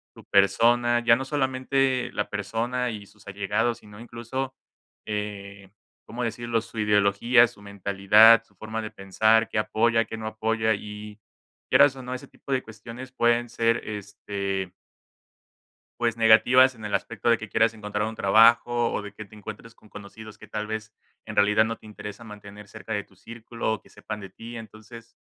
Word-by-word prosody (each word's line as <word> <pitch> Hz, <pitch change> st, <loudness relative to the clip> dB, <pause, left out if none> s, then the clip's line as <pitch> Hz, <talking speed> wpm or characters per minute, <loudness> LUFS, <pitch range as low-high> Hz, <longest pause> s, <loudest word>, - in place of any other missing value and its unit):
tu -, -, -14 dB
persona, 120 Hz, +5 st, +3 dB
ya 120 Hz, -1 st, +5 dB
no 135 Hz, -, -4 dB
solamente 130 Hz, -2 st, 0 dB
la 105 Hz, -, -2 dB
persona 120 Hz, +4 st, -2 dB
y 105 Hz, -2 st, -8 dB
sus 105 Hz, 0 st, -21 dB
allegados, 105 Hz, +4 st, -1 dB
sino 105 Hz, 0 st, -15 dB
incluso, 120 Hz, +3 st, -5 dB, 0.5 s
eh, 100 Hz, -2 st, -6 dB, 0.3 s
¿cómo 125 Hz, +2 st, -5 dB
decirlo?, 115 Hz, 0 st, -2 dB
su 115 Hz, +1 st, -13 dB
ideología, 105 Hz, +3 st, +4 dB
su 115 Hz, -3 st, -17 dB
mentalidad, 100 Hz, +3 st, +5 dB
su 100 Hz, -, -31 dB
forma 110 Hz, +3 st, -5 dB
de 110 Hz, -, -6 dB
pensar, 110 Hz, +4 st, +2 dB
que -, -, -4 dB
apoya, 115 Hz, +1 st, +1 dB
qué 110 Hz, -, -7 dB
no 110 Hz, 0 st, -6 dB
apoya 110 Hz, 0 st, 0 dB
y 105 Hz, +1 st, -9 dB, 0.5 s
quieras 140 Hz, -2 st, +5 dB
o 130 Hz, -, -9 dB
no, 125 Hz, 0 st, -5 dB
ese 125 Hz, -, -9 dB
tipo -, -, -12 dB
de 130 Hz, -1 st, +1 dB
cuestiones 115 Hz, +4 st, -10 dB
pueden 120 Hz, -1 st, +1 dB
ser 115 Hz, 0 st, +1 dB
este 100 Hz, -2 st, -4 dB, 1.3 s
Pues, 115 Hz, -1 st, 0 dB
negativas, 125 Hz, +3 st, +5 dB
en 110 Hz, -, -11 dB
el 105 Hz, -1 st, -4 dB
aspecto 115 Hz, +1 st, -2 dB
de 115 Hz, -1 st, +4 dB
que 110 Hz, -, -8 dB
quieras 115 Hz, +2 st, +2 dB
encontrar 105 Hz, -1 st, -3 dB
un 110 Hz, -, -5 dB
trabajo, 115 Hz, +3 st, +4 dB
o -, -, -2 dB
de 105 Hz, -1 st, -9 dB
que 105 Hz, +1 st, -9 dB
te 100 Hz, -, -17 dB
encuentres 110 Hz, +2 st, -10 dB
con 110 Hz, -, -22 dB
conocidos 105 Hz, +1 st, -11 dB
que, -, -, -13 dB
tal 105 Hz, 0 st, -5 dB
vez, 110 Hz, 0 st, -5 dB, 0.3 s
en -, -, -7 dB
realidad, 105 Hz, +1 st, +4 dB
no 115 Hz, +1 st, -3 dB
te -, -, -18 dB
interesa 105 Hz, +1 st, -9 dB
mantener 105 Hz, -2 st, -12 dB
cerca 110 Hz, -, -9 dB
de 105 Hz, -1 st, -1 dB
tu 95 Hz, -, -25 dB
círculo 115 Hz, +2 st, -5 dB
o 110 Hz, -, -4 dB
que -, -, -21 dB
sepan 110 Hz, -1 st, -7 dB
de 95 Hz, -1 st, -10 dB
ti, 115 Hz, +5 st, -10 dB
entonces, 115 Hz, +1 st, -12 dB
110 Hz, 180 wpm, -25 LUFS, 105-120 Hz, 1.3 s, ya